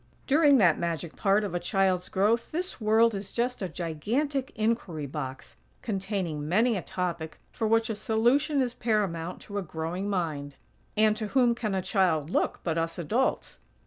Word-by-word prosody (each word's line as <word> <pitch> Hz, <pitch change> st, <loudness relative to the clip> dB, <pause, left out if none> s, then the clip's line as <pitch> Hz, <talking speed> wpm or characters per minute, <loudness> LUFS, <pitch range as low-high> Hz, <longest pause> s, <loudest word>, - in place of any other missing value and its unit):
During 290 Hz, -1 st, +5 dB
that 175 Hz, -8 st, +4 dB
magic 170 Hz, -1 st, -3 dB
part 200 Hz, +1 st, +2 dB
of 200 Hz, -4 st, -3 dB
a 175 Hz, -, 0 dB
child's 185 Hz, 0 st, +1 dB
growth 215 Hz, +5 st, +1 dB
this 355 Hz, -3 st, -3 dB
world 220 Hz, +2 st, +4 dB
is 195 Hz, -1 st, -5 dB
just 245 Hz, 0 st, -1 dB
a 190 Hz, -, -2 dB
gigantic 245 Hz, -, -2 dB
inquiry 215 Hz, -9 st, -1 dB
box, 135 Hz, -2 st, -6 dB, 0.3 s
containing 190 Hz, -8 st, -3 dB
many 225 Hz, +6 st, +3 dB
a 190 Hz, -, -2 dB
topic 170 Hz, -4 st, -4 dB
for 225 Hz, -, -1 dB
which 225 Hz, 0 st, +3 dB
a 225 Hz, -, -2 dB
solution 240 Hz, +7 st, +2 dB
is 245 Hz, -1 st, -3 dB
paramount 185 Hz, -8 st, -1 dB
to 205 Hz, -1 st, -5 dB
a -, -, -2 dB
growing 170 Hz, +3 st, -4 dB
mind. 155 Hz, -7 st, -2 dB, 0.4 s
And 215 Hz, 0 st, +4 dB
to 215 Hz, -1 st, -3 dB
whom 245 Hz, +1 st, +3 dB
can 215 Hz, -4 st, -2 dB
a 190 Hz, -, -1 dB
child 175 Hz, -5 st, +1 dB
look, -, -, 0 dB
but 165 Hz, -1 st, 0 dB
us 165 Hz, 0 st, -2 dB
adults? 220 Hz, -, -1 dB
195 Hz, 175 wpm, -28 LUFS, 170-230 Hz, 0.4 s, During